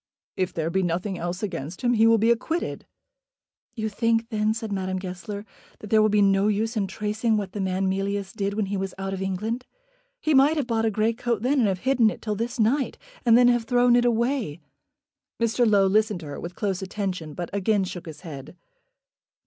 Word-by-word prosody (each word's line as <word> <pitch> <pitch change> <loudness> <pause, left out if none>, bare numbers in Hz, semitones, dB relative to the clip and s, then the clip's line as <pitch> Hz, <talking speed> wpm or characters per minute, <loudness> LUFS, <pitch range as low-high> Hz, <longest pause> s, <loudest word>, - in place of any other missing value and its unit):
"If 185 -1 -1
there 165 -1 -2
be 190 - +1
nothing 185 +2 -2
else 175 +4 -4
against 170 -4 -5
him 245 0 +3
he 225 -1 +5
will 225 0 +6
be 225 +2 +3
acquitted." 320 +9 -2 0.9
"You 220 -2 -2
think 230 +1 0
then," 215 -2 +1
said 225 -1 -4
Madame 190 -1 -2
Goesler, 190 +3 -6 0.3
"that 210 - -11
there 220 -1 +6
will 215 - +4
be 205 0 +4
no 195 +1 +3
use 220 +3 0
in 200 -3 0
tracing 215 +3 -1
what 200 -2 -3
the 205 - -4
man 190 0 0
Mealyus 195 +1 -2
did 200 -2 -2
when 215 -1 0
he 195 +1 -3
was 190 -1 -4
out 195 0 -3
of 190 - -4
England. 215 +6 -2 0.6
He 310 -10 +1
might 285 +4 +5
have 290 - 0
bought 225 -2 0
a - - +3
grey 220 +2 +1
coat 235 -2 -2
then, 270 +3 +2
and 230 - +4
have 190 -2 -1
hidden 255 -4 +3
it - - -6
till 215 - -3
this 230 +3 -3
night, 255 +5 +1 0.3
and 230 0 +7
then 245 0 +6
have 240 -2 +2
thrown 245 0 +4
it 245 - +4
away." 235 - 0 0.8
Mr. 230 0 +2
Low 200 -2 +5
listened 210 -1 +2
to - - -9
her 145 - -6
with 175 +1 -7
close 195 -3 -2
attention, 185 -6 -4
but 175 -2 -5
again 200 0 +1
shook 180 -1 -6
his 155 - -9
head. 155 -1 -9
210 Hz, 215 wpm, -25 LUFS, 190-230 Hz, 0.9 s, and